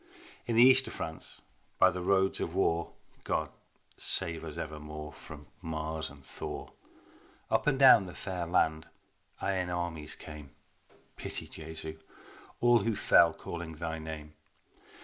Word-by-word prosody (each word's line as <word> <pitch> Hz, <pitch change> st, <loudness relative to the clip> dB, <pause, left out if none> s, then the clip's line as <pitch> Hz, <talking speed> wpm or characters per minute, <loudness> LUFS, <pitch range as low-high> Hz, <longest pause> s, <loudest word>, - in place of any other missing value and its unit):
In 115 Hz, -, 0 dB
the 115 Hz, -, +8 dB
east 130 Hz, +1 st, +7 dB
of -, -, -6 dB
France 80 Hz, 0 st, -7 dB, 0.4 s
by 95 Hz, -, +6 dB
the 90 Hz, 0 st, -5 dB
roads 95 Hz, +1 st, +2 dB
of 85 Hz, -, -3 dB
war, 85 Hz, -3 st, +1 dB, 0.3 s
(God -, -, -1 dB, 0.5 s
save 85 Hz, 0 st, +1 dB
us 80 Hz, -2 st, -7 dB
evermore 75 Hz, 0 st, -7 dB
from 75 Hz, -1 st, -2 dB, 0.2 s
Mars 80 Hz, 0 st, -3 dB
and 70 Hz, -1 st, -15 dB
Thor!) -, -, 0 dB, 0.8 s
Up -, -, +1 dB
and 140 Hz, -2 st, +3 dB
down 130 Hz, -7 st, +7 dB
the 90 Hz, -, -10 dB
fair 90 Hz, -4 st, -4 dB
land 80 Hz, -2 st, +1 dB, 0.5 s
iron 95 Hz, -2 st, -1 dB
armies 85 Hz, -4 st, -3 dB
came, 75 Hz, -2 st, -11 dB, 0.6 s
(Pity, -, -, -5 dB
Jesu, 80 Hz, 0 st, -8 dB, 0.6 s
all 120 Hz, 0 st, +6 dB
who 115 Hz, -1 st, -1 dB
fell, -, -, +6 dB
calling 85 Hz, -1 st, -7 dB
Thy 80 Hz, 0 st, -4 dB
name). 80 Hz, -1 st, -8 dB
80 Hz, 140 wpm, -31 LUFS, 80-95 Hz, 0.8 s, the